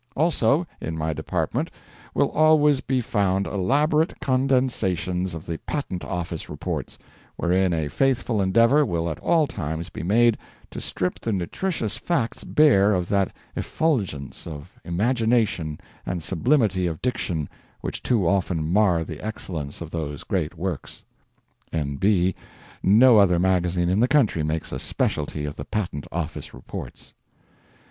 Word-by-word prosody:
Also, 155 -1 +2 0.2
in 80 0 -4
my 80 0 -1
department - - -2 0.5
will - - +2
always 150 -3 +4
be 130 -1 0
found 100 -4 +1
elaborate 150 - +1
condensations 125 -9 0
of 80 - -8
the 85 -1 -4
Patent 135 -12 -4
Office 85 -3 -4
Reports, - - -4 0.4
wherein 90 +1 +2
a 80 -3 0
faithful 125 - +1
endeavour 115 +10 +4
will 85 - -1
at 80 - -6
all 160 - +3
times 80 - -4
be - - -7
made 115 +5 +3 0.3
to - - -6
strip 90 - -2
the 115 - -2
nutritious 110 - -2
facts 135 -10 -1
bare 105 -10 +4
of 90 -1 -2
that 100 -2 +2 0.2
effulgence 100 - -2
of 75 -3 -8
imagination 110 - +1 0.2
and 90 -2 -3
sublimity 95 - +2
of 80 -2 -4
diction 85 - -1 0.3
which - - -4
too 110 -9 +1
often 90 -3 +1
mar 95 -5 +3
the 80 -2 -8
excellence 85 -10 -5
of 80 -1 -6
those 75 -4 -4
great 90 -3 -2
works. 85 -3 -5 0.3
[ - - -40
N. 70 -4 -2
B. 95 0 +3 0.5
No 110 +4 +6
other 90 -3 +5
magazine 90 -1 +1
in 95 +3 +2
the 120 - +4
country 130 - +3
makes 75 +1 -2
a - - -3
specialty 75 0 -1
of 75 - -6
the - - -6
Patent 90 -9 -3
Office 80 -3 -5
Reports. - - -9
95 Hz, 145 wpm, -24 LUFS, 85-120 Hz, 0.5 s, No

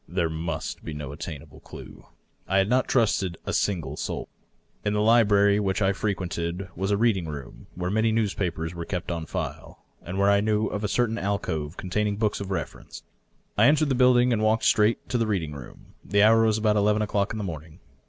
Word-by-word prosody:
There 85 -1 -1
must 80 +1 -4
be 75 - -6
no 75 -2 -6
attainable 75 -1 -8
clue. - - -12 0.4
I 95 - +1
had 95 0 +3
not 125 +3 +2
trusted 100 -8 +1
a - - -3
single 80 -8 -1
soul. - - -4 0.5
In 105 - 0
the 105 - +1
library 105 -2 +4
which 95 -2 0
I 100 -1 +2
frequented 95 -2 -3
was 95 +3 -2
a 100 - +2
reading 100 -6 +1
room, 70 -4 -8
where 90 0 -3
many 110 +2 +2
newspapers 95 -7 -1
were 85 -1 -5
kept 90 0 -4
on 80 -2 -4
file, - - -6 0.2
and 90 +3 -6
where 100 +1 +4
I 100 0 +4
knew 110 0 +1
of 105 0 -3
a - - +1
certain 115 +2 0
alcove 90 -5 -3
containing 105 +2 -1
books 105 -2 0
of 100 - -5
reference. 95 - -6 0.6
I 110 - +7
entered 155 0 +3
the - - +2
building 125 -1 +4
and 110 - 0
walked 110 +1 +2
straight 105 +2 +3
to 125 - 0
this 115 - +1
reading 90 -8 -1
room. 70 -4 -12
The 100 +1 +2
hour 115 +1 +6
was 110 -1 +2
about 105 -1 +2
eleven 105 +1 +2
o^clock 100 -1 0
in 110 - -4
the 105 - -3
morning. 80 -4 -7
100 Hz, 205 wpm, -25 LUFS, 85-110 Hz, 0.6 s, I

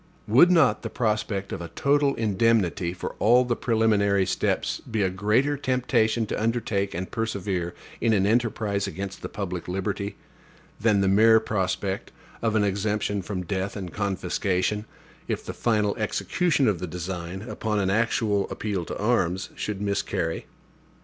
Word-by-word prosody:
Would 130 +11 +7
not 165 -7 +4
the - - -4
prospect 105 -3 -1
of - - -4
a 85 - -5
total 140 - +2
indemnity 105 -5 +1
for 90 - -5
all 120 +4 +5
the 120 -1 0
preliminary 105 -5 +2
steps - - 0
be 110 -3 0
a 95 - +1
greater 110 +10 +2
temptation 120 -4 +1
to 105 - -3
undertake 110 -4 0
and 90 +2 -4
persevere 100 -6 -2 0.3
in 115 - +3
an 100 -3 +3
enterprise 110 -2 +1
against 95 0 -6
the - - -5
public 90 -4 -5
liberty, 100 +2 -3 0.6
than 105 -2 +3
the 95 - +2
mere 110 +3 +6
prospect 95 -2 -2 0.3
of 115 -1 0
an 105 - +3
exemption 100 0 0
from 95 -1 -4
death 95 +1 -2
and 95 -4 -6
confiscation, 100 +1 -1 0.4
if - - -3
the - - -5
final 105 -3 +1
execution 140 - +1
of 100 -5 +1
the 90 - -4
design, 90 +2 -5
upon 110 -2 -2
an 95 -1 +1
actual 105 -2 +1
appeal 100 -5 -3
to - - -5
arms, 95 -5 0
should 105 -2 -4
miscarry? 100 -5 -2
105 Hz, 155 wpm, -25 LUFS, 95-115 Hz, 0.6 s, Would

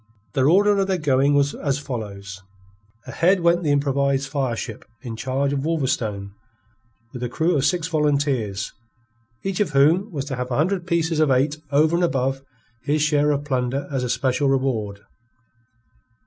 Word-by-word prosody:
The 135 - +1
order 200 +8 +4
of 195 - +1
their 190 -1 +1
going 140 -2 +2
was 140 0 +2
as 140 -1 -1
follows: 100 -8 -6 0.6
Ahead 185 +2 +2
went 170 +1 +3
the 155 - -1
improvised 140 -1 +1
fire 135 -5 -1
ship 115 -1 -6 0.2
in 115 -3 -5
charge 135 +4 -1
of 140 - -1
Wolverstone, 115 -11 -1 0.8
with 125 - -7
a 125 - -2
crew 160 +8 +1
of 140 -1 +1
six 170 +1 +1
volunteers, 140 - 0 0.7
each 195 -2 -2
of 210 - +1
whom 165 +10 +3
was 140 -4 -4
to 140 -2 -4
have 125 0 -3
a 120 - -1
hundred 175 +3 0
pieces 165 -2 0
of 155 -2 +3
eight 135 +3 +2
over 155 +3 +3
and 175 - +1
above 135 -4 0 0.4
his 145 +3 0
share 150 -1 +2
of 145 0 0
plunder 130 0 -1
as 135 -2 -1
a 125 - -2
special 130 +3 +1
reward. 115 -7 -1
140 Hz, 170 wpm, -22 LUFS, 130-155 Hz, 0.8 s, order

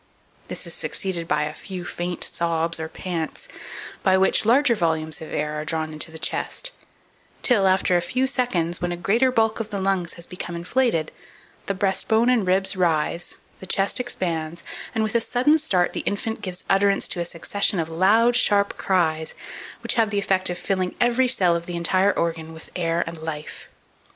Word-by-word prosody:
This - - -3
is - - -1
succeeded 175 -4 -1
by 150 -1 +1
a 150 0 -3
few 180 +1 -7
faint 175 0 -2
sobs 165 0 -1
or 160 0 -4
pants, 175 - -5 0.5
by 190 -1 +4
which 190 +3 +3
larger 255 +2 +5
volumes 160 -6 -1
of 160 - -8
air 150 0 -2
are - - -4
drawn 155 0 -2
into 155 +2 -1
the 160 - -7
chest, - - -1 0.7
till, 205 -7 +4
after 185 -1 +3
a 175 - +3
few 255 +9 0
seconds, 190 -11 0
and - - -20
when 175 0 -1
a 175 - -3
greater 230 +9 +2
bulk 225 -2 +1
of 220 -1 -4
the 200 - -3
lungs 190 -3 0
has 170 - -4
become 180 -1 -6
inflated, 175 -2 0 0.6
the 200 - -1
breast 190 0 0
bone 230 +3 +4
and 225 -7 +2
ribs 190 +1 +2
rise, 170 -1 0 0.2
the 190 - -7
chest 195 +5 +1
expands, 170 -8 -2 0.3
and, 220 - +2
with 215 - -1
a 235 - +3
sudden 255 +7 +3
start, 185 - +1
the - - -2
infant 220 +2 -3
gives 185 -2 -4
utterance 195 0 +3
to - - -4
a - - +1
succession 175 +3 0
of 165 0 -2
loud, 215 +8 +4
sharp 205 -4 +3
cries, 160 -4 0 0.5
which - - +1
have 225 -3 +2
the 205 - -2
effect 190 -2 +1
of 175 - -3
filling 185 -1 -1
every 245 +1 +3
cell 185 -8 +3
of 170 0 -4
the 175 - -4
entire 185 +3 +3
organ 165 -2 -2
with 160 - -12
air 170 -1 0
and 165 -1 -7
life. 155 -1 -6
185 Hz, 195 wpm, -23 LUFS, 165-215 Hz, 0.7 s, larger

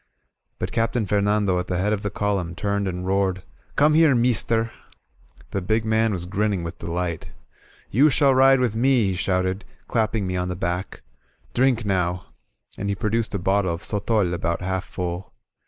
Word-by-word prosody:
'' - - -54
But - - -4
Captain 115 0 0
Fernando 100 -2 +1
at 90 - -4
the 90 - -1
head 105 +4 +1
of 105 - -2
the 105 - -2
column 95 -5 -2
turned 100 +1 -1
and 90 0 -4
roared: 95 -1 0 0.3
"Come 150 +1 +4
here, 155 -3 +5
meester!'' 115 -1 +2 0.8
The 100 - -2
big 110 +4 0
man 110 0 +2
was 90 -3 -3
grinning 100 -1 -1
with 85 0 -6
delight. 85 -1 -3 0.6
"You 140 +8 +5
shall 140 -1 +4
ride 135 +1 +5
with 120 -4 0
me," 120 -3 +3
he - - -2
shouted, 95 +1 0 0.2
clapping 110 -3 0
me 90 0 -2
on 90 0 -1
the 90 - -3
back. 90 +2 -4 0.5
^^Drink, 125 -3 +2
now," 90 -3 0 0.5
and 100 - -2
he 100 - 0
produced 110 +1 -1
a - - +1
bottle 95 -1 +1
of 85 - -9
sotol 105 -3 0
about 85 0 -2
half 95 0 -2
full. 90 +1 -5
100 Hz, 180 wpm, -23 LUFS, 90-115 Hz, 0.8 s, here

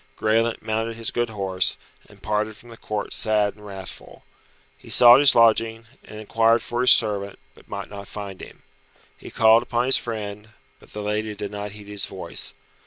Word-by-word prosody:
Graelent 115 +1 0
mounted 110 +1 -2
his 115 -1 -4
good 120 -1 -1
horse, 95 -3 0 0.3
and - - -19
parted 105 +1 -2
from 120 +2 -16
the - - -10
Court 105 -2 -5
sad 105 -2 +1
and 105 - -18
wrathful. 95 -3 -10 0.5
He - - -17
sought 120 +1 +8
his 145 -1 +6
lodging, 115 0 +3 0.2
and 105 - -11
inquired 115 +1 +2
for 120 +1 -3
his 125 - +4
servant, 100 -3 +2 0.2
but - - -21
might 100 -1 -6
not 100 -1 -10
find 100 -2 -8
him. - - -13 0.5
He - - -12
called 110 +1 +5
upon 120 0 -1
his 130 - +4
friend, 105 -2 -6 0.3
but - - -19
the 105 - -6
lady 105 +1 -3
did 100 -1 -6
not 105 -1 -6
heed 105 -1 -11
his 105 -1 0
voice. 95 -7 -5
110 Hz, 185 wpm, -23 LUFS, 105-115 Hz, 0.5 s, sought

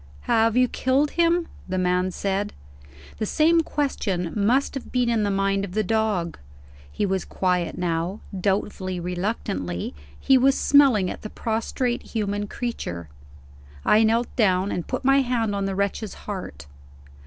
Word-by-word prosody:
"Have 225 - +2
you 250 0 +5
killed 265 +4 +1
him?" 340 0 +2 0.2
the 185 - -1
man 180 0 +1
said. 200 +2 -2 0.7
The 215 - -1
same 330 +6 +4
question 200 - -2
must 235 +7 +2
have 270 - -7
been 245 -2 +1
in 225 -2 +2
the 205 - +1
mind 195 0 +1
of 190 -2 -6
the 215 +1 +1
dog. 210 -5 0 0.5
He 75 - -1
was 190 -2 0
quiet 180 -2 -1
now. 175 +3 -1 0.2
Doubtfully, 190 -1 -1
reluctantly, 175 - -3 0.3
he 265 -1 +4
was 270 +1 +4
smelling 260 -10 +4
at - - -8
the 215 - -6
prostrate 235 +3 -2
human 205 -2 -3
creature. 85 - -5 0.8
I 215 - +5
knelt 230 +2 +1
down, 190 -3 +2
and 175 - -3
put - - -3
my 275 +1 +5
hand 240 -5 0
on 200 -1 -1
the 195 -1 -2
wretch's 200 +2 -2
heart. 180 - -6
205 Hz, 155 wpm, -24 LUFS, 185-240 Hz, 0.8 s, you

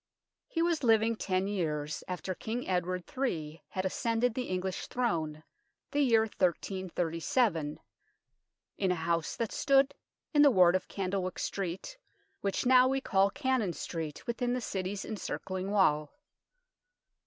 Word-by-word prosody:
He 330 - 0
was 335 -3 +1
living 225 -1 +4
ten 185 -3 0
years 155 -6 -2
after 185 +1 -3
King 230 +6 -4
Edward 180 0 0
III. 165 - -2
had 185 0 -3
ascended 230 +4 +1
the 250 +1 -2
English 185 0 -2
throne 160 -11 -1 0.5
the 290 - +2
year 235 -5 +5
1337 180 - 0 1.0
in 190 -2 +2
a - - +2
house 165 0 -1
that 230 -2 -2
stood 275 0 +3 0.4
in 295 - +6
the 290 - +8
ward 185 -7 +5
of 185 - -1
Candlewyck 185 -1 -2
Street, 195 - -4 0.4
which 195 +4 -1
now 255 0 +7
we 270 +1 +1
call 195 -6 +3
Cannon 260 - 0
Street, 160 -4 -5
within 245 +1 -1
the 250 - 0
City's 195 -2 -3
encircling 190 -3 -4
wall. 155 -7 +3
195 Hz, 135 wpm, -31 LUFS, 180-245 Hz, 1.0 s, the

